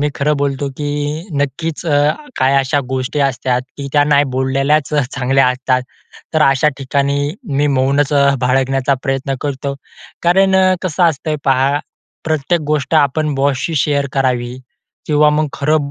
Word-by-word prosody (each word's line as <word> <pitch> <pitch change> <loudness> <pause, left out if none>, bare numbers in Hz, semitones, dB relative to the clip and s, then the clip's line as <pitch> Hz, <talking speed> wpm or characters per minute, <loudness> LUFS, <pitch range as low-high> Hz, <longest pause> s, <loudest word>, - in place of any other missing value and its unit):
मी 145 - +1
खरं 150 +1 0
बोलतो, 140 0 -1
की 145 -1 -3 0.5
नक्कीच 150 +4 -3
अ, 145 - +2 0.4
काही 130 +1 +2
अशा 135 +1 +1
गोष्टी 130 +2 -2
असतात 130 -2 0
की 140 -1 -6
त्या 145 -1 +4
नाही 145 -1 +3
बोललेल्याच 135 +3 +1
चांगल्या 135 -1 +1
असतात. 130 0 0 0.5
तर 155 - +4
अशा 135 +2 +3
ठिकाणी, 140 +1 -1 0.2
मी 145 - +2
मौनच 140 +2 +1
अ, 140 -1 +4 0.2
बाळगण्याचा 135 +1 +1
प्रयत्न 135 +1 -2
करतो. 140 -1 -3 0.5
कारण 190 +2 +3
अ, 185 0 +4
कसं 185 -1 -1
असतंय 155 0 -2
पहा, 135 +2 +2 0.5
प्रत्येक 160 +2 0
गोष्ट 150 +1 -1
आपण 150 0 +2
बॉसशी 140 +3 0
शेअर 140 0 +1
करावी 125 -2 -1 0.5
किंवा 150 0 +4
मग 155 +1 +1
खरं 145 0 0
140 Hz, 145 wpm, -16 LUFS, 135-150 Hz, 0.5 s, त्या